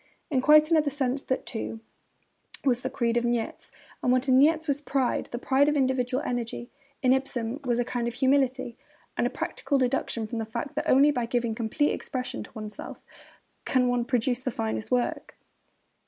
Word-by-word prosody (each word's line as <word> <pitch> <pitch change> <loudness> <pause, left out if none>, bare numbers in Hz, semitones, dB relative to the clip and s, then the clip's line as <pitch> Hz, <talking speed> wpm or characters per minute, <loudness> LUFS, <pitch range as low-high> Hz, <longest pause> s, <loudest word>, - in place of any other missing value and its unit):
In 260 -3 +2
quite 305 +3 +6
another 310 -3 +4
sense 270 -1 -1
that, 260 - -2
too, 225 -2 -4 0.9
was 250 -3 +2
the 260 - -2
creed 240 -3 0
of 240 - +1
Nietzsche; 240 -1 -2 0.3
but - - 0
what 255 +2 +3
in 260 0 +5
Nietzsche 315 +3 +4
was 285 0 0
pride, 275 -3 0
the 240 - -5
pride 270 +3 +3
of 300 - +1
individual 260 0 +1
energy, 240 0 -3 0.3
in 255 0 +5
Ibsen 265 -1 -2
was 240 -2 +1
a 245 - +1
kind 240 -1 -2
of 235 - -4
humility, 260 -2 +1 0.4
or - - +1
a - - +2
practical 280 - -2
deduction 250 -3 0
from 225 +2 -4
the 225 - -2
fact 275 +6 -5
that 305 +2 -2
only 280 +3 +6
by 245 -4 -2
giving 235 -1 0
complete 230 +6 0
expression 255 -1 -4
to - - -10
oneself 215 -1 -7 0.6
can 255 -1 +2
one 245 -1 +1
produce 245 -1 0
the 255 - -3
finest 110 - -3
work. 245 -1 -1
255 Hz, 185 wpm, -27 LUFS, 240-275 Hz, 0.9 s, quite